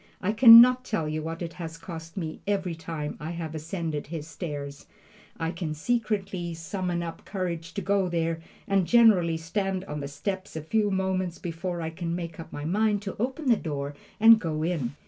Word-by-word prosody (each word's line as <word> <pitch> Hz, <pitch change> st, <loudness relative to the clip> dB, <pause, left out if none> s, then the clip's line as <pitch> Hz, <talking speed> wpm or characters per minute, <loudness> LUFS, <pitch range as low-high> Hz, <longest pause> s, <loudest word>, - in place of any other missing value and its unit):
I 200 Hz, -, 0 dB
can 230 Hz, +1 st, +11 dB
not 250 Hz, +1 st, +4 dB
tell 165 Hz, -11 st, -2 dB
you 155 Hz, +1 st, -2 dB
what 165 Hz, +2 st, -5 dB
it 165 Hz, -1 st, -5 dB
has 165 Hz, 0 st, -6 dB
cost 165 Hz, 0 st, -9 dB
me 160 Hz, -4 st, -4 dB
every 195 Hz, -4 st, 0 dB
time 160 Hz, -2 st, -5 dB
I 155 Hz, -, -5 dB
have 165 Hz, -2 st, -5 dB
ascended 160 Hz, -1 st, -4 dB
his 155 Hz, -1 st, -5 dB
stairs. 145 Hz, -3 st, -6 dB, 0.5 s
I 165 Hz, 0 st, -1 dB
can 165 Hz, -3 st, -4 dB
scarcely 195 Hz, -3 st, -1 dB
summon 175 Hz, +1 st, -3 dB
up 165 Hz, -1 st, -7 dB
courage 175 Hz, -4 st, -4 dB
to 200 Hz, -, -3 dB
go 195 Hz, 0 st, +1 dB
there, 165 Hz, -1 st, -1 dB, 0.3 s
and 195 Hz, -3 st, +2 dB
generally 200 Hz, -9 st, +5 dB
stand 190 Hz, +3 st, -2 dB
on 150 Hz, -3 st, -5 dB
the 140 Hz, -, -4 dB
steps 185 Hz, +8 st, -5 dB
a 160 Hz, -, -3 dB
few 210 Hz, +6 st, +1 dB
moments 190 Hz, -2 st, -1 dB
before 175 Hz, +1 st, -4 dB
I 160 Hz, -, -3 dB
can 170 Hz, 0 st, -3 dB
make 170 Hz, -2 st, -6 dB
up 165 Hz, -, -9 dB
my 145 Hz, -, -6 dB
mind 205 Hz, +4 st, +1 dB
to 195 Hz, -, -5 dB
open 265 Hz, +6 st, -2 dB
the 240 Hz, -, +6 dB
door 145 Hz, -6 st, -4 dB, 0.3 s
and 225 Hz, +1 st, +8 dB
go 155 Hz, -4 st, -2 dB
in. 155 Hz, -7 st, -1 dB
170 Hz, 195 wpm, -27 LUFS, 160-195 Hz, 0.5 s, can